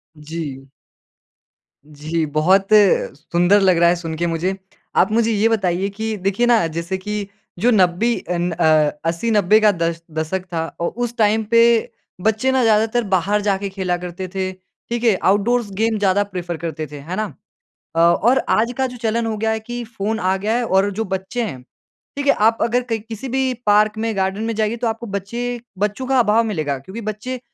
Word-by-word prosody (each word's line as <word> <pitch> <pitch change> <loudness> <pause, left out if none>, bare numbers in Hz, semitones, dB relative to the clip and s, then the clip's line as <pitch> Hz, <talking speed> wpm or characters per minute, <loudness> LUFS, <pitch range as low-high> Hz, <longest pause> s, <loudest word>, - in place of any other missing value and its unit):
जी। 150 -3 -7 1.2
जी, 155 +2 -3
बहुत 170 +7 +2
सुंदर 185 -2 +3
लग 185 -3 +4
रहा 170 0 +5
है 175 - +3
सुन 165 -2 -5
के 175 +1 0
मुझे। 170 +3 -1 0.4
आप 190 - +4
मुझे 230 +1 +2
ये 220 +1 +2
बताइए 195 -3 0
कि 220 +2 -4
देखिए, 195 +5 0
ना 235 -6 +4
जैसे 170 +3 -3
कि 205 +1 -4 0.3
जो 240 +6 +3
नब्बे 200 +3 +3
अन 175 0 0
अ 165 0 0 0.4
80-90 210 +3 +3
का 215 -1 +5
दश 165 -2 -2
दशक 160 +4 -3
था, 165 -1 -1 0.2
औ 170 - +1
उस 240 +1 -3
टाइम 220 0 +3
पे 235 0 +4 0.3
बच्चे 220 +6 +1
ना 265 -1 +2
ज़्यादातर 225 +2 +2
बाहर 200 +3 +2
जाके 200 -1 -1
खेला 190 -2 -2
करते 180 +1 -6
थे। 190 -1 -1
ठीक 225 +5 -8
है? 225 -4 +4
आउटडोर्स 210 +4 +2
गेम 225 0 +1
ज़्यादा 200 0 +2
प्रेफ़र 175 -4 -5
करते 160 -1 -5
थे, 145 +1 -9
है 165 +6 -6
ना? 215 +1 -1 0.7
अ, - - +1
और 190 +10 +4
आज 230 +2 +2
का 265 0 +1
जो 250 -1 -9
चलन 230 0 0
हो 225 -1 -2
गया 220 +1 0
है 220 - -1
कि 240 +2 -6
फ़ोन 220 -1 -3
आ 185 +1 +1
गया 210 +3 -1
है 245 - 0
और 195 -1 +2
जो 215 +3 -2
बच्चे 190 +6 -4
हैं 130 - -5 0.6
ठीक 285 0 -2
है, 280 - +6
आप 225 +2 +3
अगर 240 +2 +2
कहीं 230 -2 -2
किसी 225 +3 -8
भी 260 +1 0
पार्क 210 +1 +3
में 225 0 -2
गार्डन 190 +2 -1
में 230 0 -1
जाएँगे 215 +1 0
तो 235 0 -1
आपको 225 +1 -4
बच्चे 235 +5 -3 0.2
बच्चों 210 +6 -1
का 265 -1 +3
अभाव 225 0 +3
मिलेगा। 155 -10 -2
क्योंकि 190 - -9
बच्चे 215 +4 -5
205 Hz, 195 wpm, -20 LUFS, 180-225 Hz, 1.2 s, है